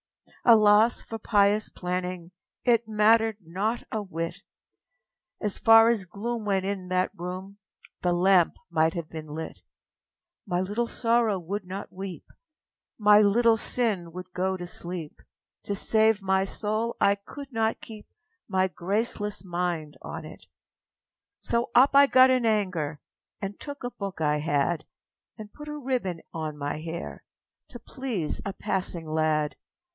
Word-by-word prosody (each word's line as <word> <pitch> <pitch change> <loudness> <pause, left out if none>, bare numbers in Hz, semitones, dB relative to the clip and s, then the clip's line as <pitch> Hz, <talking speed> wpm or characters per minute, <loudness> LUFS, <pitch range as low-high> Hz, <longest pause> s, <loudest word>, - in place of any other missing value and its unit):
â 235 - +10
Alas 215 +2 +4
for 225 - -7
pious 205 -1 +2
planning 180 -1 -4 0.3
It 235 -2 +3
mattered 220 0 +3
not 195 +8 -2
a 220 - -1
whit! 165 -4 -5 1.0
As 210 -2 -2
far 225 0 +7
as 220 -5 0
gloom 220 +5 -4
went 195 -2 0
in 195 -2 -3
that 185 0 0
room, 185 +3 -7 0.4
The 180 - +1
lamp 180 0 +4 0.2
might 160 0 +2
have 170 -2 -4
been 155 -1 -7
lit! 160 +2 -7 0.9
My 175 - 0
Little 205 +6 -1
Sorrow 230 -3 +1
would 185 +2 -5
not 195 +2 -7
weep, 190 -2 -7 0.7
My 210 -1 +6
Little 225 +3 +4
Sin 210 -8 +1
would 180 0 -9
go 190 +1 -1
to 175 - -6
sleep 175 -2 -6 0.4
To 200 - -1
save 220 0 +2
my 190 0 +2
soul 215 +3 -2
I 200 - +5
could 270 +8 -10
not 225 -1 0
keep 215 -2 -11 0.4
My 190 -1 +2
graceless 205 +3 -2
mind 175 -4 -2
on - - -7
it! - - -12 0.9
So 235 +1 -1
up 260 +3 +7
I 280 0 +7
got 260 -1 +6
in 250 -3 +2
anger, 180 -9 0 0.4
And 200 0 -5
took 285 -2 -8
a 245 - -3
book 200 -5 -6
I 150 -1 +1
had, 150 +2 0 0.5
And 215 -2 -10
put 295 0 -10
a 300 0 -5
ribbon 245 - -2
on 155 -2 -4
my 145 +1 -3
hair 165 +1 -6 0.5
To 240 - -8
please 230 - -4
a 200 - -4
passing 185 -5 -3
lad. 155 -1 0
195 Hz, 150 wpm, -27 LUFS, 175-225 Hz, 1.0 s, â